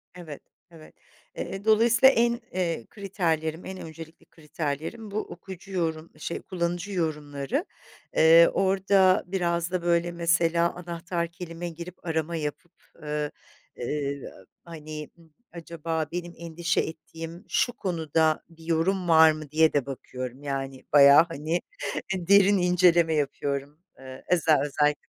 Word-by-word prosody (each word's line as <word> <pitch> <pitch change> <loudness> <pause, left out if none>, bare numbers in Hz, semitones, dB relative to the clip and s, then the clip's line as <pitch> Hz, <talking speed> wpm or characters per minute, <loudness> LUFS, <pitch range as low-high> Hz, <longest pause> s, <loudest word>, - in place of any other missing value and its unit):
evet, 160 -5 -9 0.3
evet. 160 -2 -15 0.4
Eee, 195 +2 -5
dolayısıyla 230 +4 +6
en, 235 +1 +2
eee, 170 -9 -2
kriterlerim, 165 -5 -2
en 190 0 -6
öncelikli 160 0 -11
kriterlerim 160 +7 -5
bu 215 - -1
okuyucu 190 +1 -9
yorum, 165 -3 -2
şey 170 - -5
kullanıcı 175 +2 -3
yorumları. 150 -5 -2 0.5
Eee, 165 +1 +7
orada 190 -1 +3
biraz 170 -2 -1
da 180 -2 -1
böyle 170 0 +1
mesela 170 0 +2
anahtar 170 0 -4
kelime 170 0 -7
girip 170 +2 -10
arama 160 0 -1
yapıp, 155 +2 -5 0.3
eee, 150 0 -2 0.4
eee, 140 +2 -3 0.4
hani, 155 -2 -8 0.4
acaba 165 -1 -4
benim 175 0 -5
endişe 170 +1 -1
ettiğim 165 +3 -8
şu 245 - +1
konuda 160 -5 0
bir 165 -1 -17
yorum 175 +2 0
var 160 -1 +7
mı 155 -1 -8
diye 160 0 +4
de 140 -3 +1
bakıyorum, 130 0 -7
yani, 135 -1 -4
bayağı, 140 +2 +8
hani 160 +3 -2 0.5
derin 200 +2 +5
inceleme 175 -2 +4
yapıyorum, 145 0 -2 0.2
eee, 130 0 -11
eze 165 -3 +3
özellikle. 150 +1 +1
165 Hz, 125 wpm, -26 LUFS, 155-180 Hz, 0.5 s, bayağı